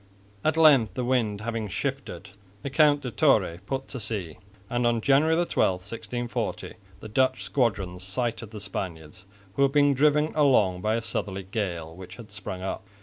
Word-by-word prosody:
At 155 +1 +1
length, 145 -9 +5
the 125 - -2
wind 115 -5 0
having 115 -1 -3
shifted, 95 +1 -4 0.3
the 140 - -4
Count 145 -1 +4
de 125 - -5
Torre 85 -5 +2
put 135 0 -3
to 130 - -6
sea; 100 -7 -4 0.3
and 120 +2 0
on 120 -1 +2
January 140 +7 +3
12, 170 - +2
1640, 115 +3 -4 0.3
the - - -7
Dutch 130 +4 +1
squadrons 100 -8 -1
sighted 115 +3 -3
the 110 -1 -8
Spaniards, 95 -2 -6 0.3
who 140 - -2
were 140 - +5
being 145 0 +4
driven 150 +3 +3
along 110 -12 +3
by 110 +2 +1
a 115 - -1
southerly 100 -3 -3
gale 90 -5 -4
which 95 0 -10
had 110 -4 -12
sprung 95 -3 -7
up. 95 - -4
115 Hz, 170 wpm, -26 LUFS, 95-135 Hz, 0.3 s, length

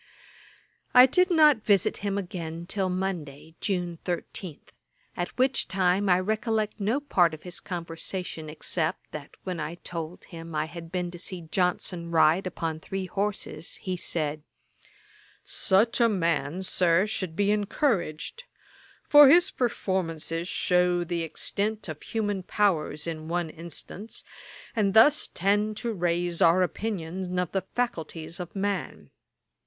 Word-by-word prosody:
I 250 0 +11
did 365 +8 +3
not 310 -5 +6
visit 200 -3 +2
him 200 -1 -2
again 170 -3 -5
till 190 0 0
Monday, 170 -5 -4
June 175 -4 -2
13, 175 -2 -4 0.6
at 175 - -2
which 260 +1 +3
time 190 +1 +2
I 180 0 +5
recollect 215 +2 -1
no 215 +7 +1
part 175 - +2
of 155 - -16
his 180 -1 -4
conversation, 170 -1 -5
except 160 +2 -2
that 145 -2 -7
when 180 -3 -4
I 155 +2 -4
told 170 -1 -7
him 165 -2 -9
I 155 0 +1
had 165 0 -9
been 180 -1 -2
to 175 - -9
see 185 0 -4
Johnson 180 -1 0
ride 165 +3 +4
upon 165 -3 -3
three 190 +3 -4
horses, 200 -2 -3
he 185 -1 -4
said, 155 -3 -2 1.0
'Such 220 +6 +2
a 230 - +6
man, 170 -3 0
Sir, 180 0 +3
should 185 -6 -3
be 205 +2 +2
encouraged; 210 - -1 0.6
for 290 -2 +9
his 345 +5 +6
performances 175 -8 -2
shew 180 -1 +2
the 170 0 -2
extent 205 +6 -2
of 155 -2 -6
the - - -15
human 205 -3 -1
powers 175 -6 0
in 160 -2 -5
one 170 -1 -1
instance, 170 +6 -7 0.5
and 205 -2 +1
thus 295 +7 +6
tend 205 +3 0
to 235 0 -2
raise 175 -1 -1
our 175 +1 +6
opinion 180 -2 -3
of 180 -2 0
the 195 - 0
faculties 165 -8 -3
of 180 +1 -7
man. 200 0 -3
180 Hz, 140 wpm, -27 LUFS, 165-205 Hz, 1.0 s, I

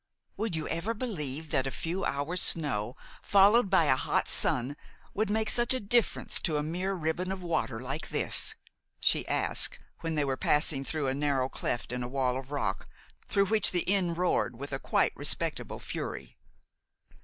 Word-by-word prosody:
"Would 215 -3 -2
you 155 -1 -3
ever 175 +8 -2
believe 160 - -4
that 135 - +1
a - - 0
few 170 +7 -3
hours' 150 +6 -1
snow, 125 -8 +1 0.3
followed 205 +2 +5
by 190 -3 +4
a 130 - +4
hot - - 0
sun, 125 +3 +4 0.4
would 215 +1 0
make 220 +1 0
such 240 +3 +2
a - - -1
difference 230 +2 +1
to 155 -4 0
a 150 - -1
mere 180 +5 -2
ribbon 175 +2 -2
of 190 -1 -5
water 165 -9 -1
like 135 +5 -5
this?" - - +1 0.4
she - - +2
asked, - - 0 0.2
when 165 -1 -3
they 150 -1 +1
were 135 -1 -1
passing 150 -1 +2
through 155 +1 -3
a 130 - +1
narrow 140 -2 0
cleft 120 -2 -3
in 125 0 -3
a 120 - -3
wall 130 -1 0
of 130 0 -6
rock 145 - -2 0.4
through 200 0 +2
which 215 0 +5
the 175 - +1
Inn 185 -3 +1
roared 175 -7 0
with 140 +2 -7
a 135 - -2
quite - - +1
respectable - - -3
fury. - - -6
160 Hz, 180 wpm, -29 LUFS, 135-195 Hz, 0.4 s, followed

